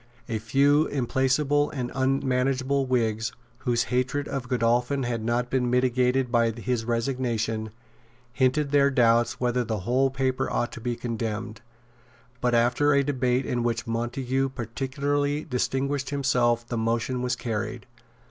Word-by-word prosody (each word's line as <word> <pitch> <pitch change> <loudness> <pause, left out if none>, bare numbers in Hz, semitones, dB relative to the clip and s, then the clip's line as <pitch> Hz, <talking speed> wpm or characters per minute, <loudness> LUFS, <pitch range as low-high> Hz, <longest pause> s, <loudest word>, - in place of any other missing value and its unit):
A 115 -2 -2
few 140 +7 +3
implacable 140 +2 +1
and 125 -4 -4
unmanageable 135 0 +1
Whigs, 110 -3 0 0.3
whose 120 -3 +1
hatred 130 +3 0
of 130 -3 -4
Godolphin 120 +2 +1
had 120 -2 -2
not 120 +2 -1
been 125 -2 +1
mitigated 125 0 +2
by 115 -2 +3
his 115 +1 -2
resignation, 115 -2 -1 0.6
hinted 140 +3 +1
their 140 -1 +5
doubts 120 -3 +3
whether 125 0 +1
the 110 -3 -3
whole 130 +6 +2
paper 130 -1 -1
ought 120 - -1
to 120 - -9
be 120 0 -2
condemned. 115 -2 -4 0.8
But 125 -1 +2
after 120 +5 +3
a 140 - +4
debate 130 -2 0
in 120 -1 -1
which 120 0 -1
Montague 125 +3 -1
particularly 140 +5 -1
distinguished 135 +2 -1
himself 125 -4 +1
the 120 -2 -2
motion 115 +3 -1
was 125 0 0
carried. 115 -4 -4
125 Hz, 140 wpm, -26 LUFS, 120-135 Hz, 0.8 s, their